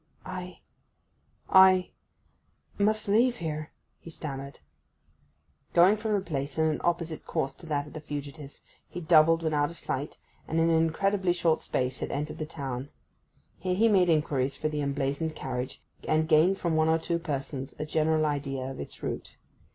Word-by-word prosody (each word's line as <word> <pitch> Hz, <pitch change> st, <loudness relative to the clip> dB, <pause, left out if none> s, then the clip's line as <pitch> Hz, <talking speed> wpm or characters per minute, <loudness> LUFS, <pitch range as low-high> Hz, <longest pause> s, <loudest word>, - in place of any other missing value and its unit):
'I—I—must 215 Hz, +1 st, +1 dB
leave 235 Hz, +5 st, +4 dB
here,' 155 Hz, -6 st, -4 dB, 0.3 s
he -, -, -11 dB
stammered. 140 Hz, -3 st, -7 dB, 1.2 s
Going 180 Hz, +4 st, +7 dB
from 215 Hz, 0 st, -2 dB
the 200 Hz, -, +2 dB
place 145 Hz, -5 st, -4 dB
in 160 Hz, -, +3 dB
an 155 Hz, -1 st, 0 dB
opposite 170 Hz, -2 st, -1 dB
course 135 Hz, -, -1 dB
to 170 Hz, -, -14 dB
that 145 Hz, -2 st, -1 dB
of 150 Hz, -, -13 dB
the 155 Hz, -, -7 dB
fugitives, 145 Hz, -1 st, -7 dB, 0.3 s
he 180 Hz, -, -6 dB
doubled 165 Hz, 0 st, +5 dB
when 160 Hz, -1 st, 0 dB
out 145 Hz, 0 st, +2 dB
of 170 Hz, -, -11 dB
sight, 140 Hz, +3 st, -3 dB, 0.3 s
and 160 Hz, -, 0 dB
in 165 Hz, 0 st, +3 dB
an -, -, +4 dB
incredibly 190 Hz, +2 st, +1 dB
short 165 Hz, -2 st, +1 dB
space 130 Hz, 0 st, -1 dB
had -, -, -3 dB
entered 150 Hz, +2 st, -4 dB
the 155 Hz, -, -3 dB
town. 135 Hz, -3 st, -5 dB, 0.7 s
Here 185 Hz, -1 st, -1 dB
he 225 Hz, +4 st, +4 dB
made 190 Hz, -5 st, +4 dB
inquiries 140 Hz, -4 st, +1 dB
for 155 Hz, -, -1 dB
the 150 Hz, -1 st, -2 dB
emblazoned 140 Hz, +3 st, -1 dB
carriage, 125 Hz, -1 st, -5 dB, 0.2 s
and 155 Hz, 0 st, +2 dB
gained 165 Hz, +4 st, +4 dB
from 170 Hz, -4 st, -1 dB
one 160 Hz, 0 st, +3 dB
or 160 Hz, -, +4 dB
two 170 Hz, +1 st, -2 dB
persons 140 Hz, -4 st, -4 dB
a 150 Hz, -, -3 dB
general 155 Hz, 0 st, +2 dB
idea 135 Hz, -3 st, -2 dB
of -, -, -9 dB
its -, -, -9 dB
route. -, -, -5 dB
155 Hz, 165 wpm, -28 LUFS, 145-170 Hz, 1.2 s, Going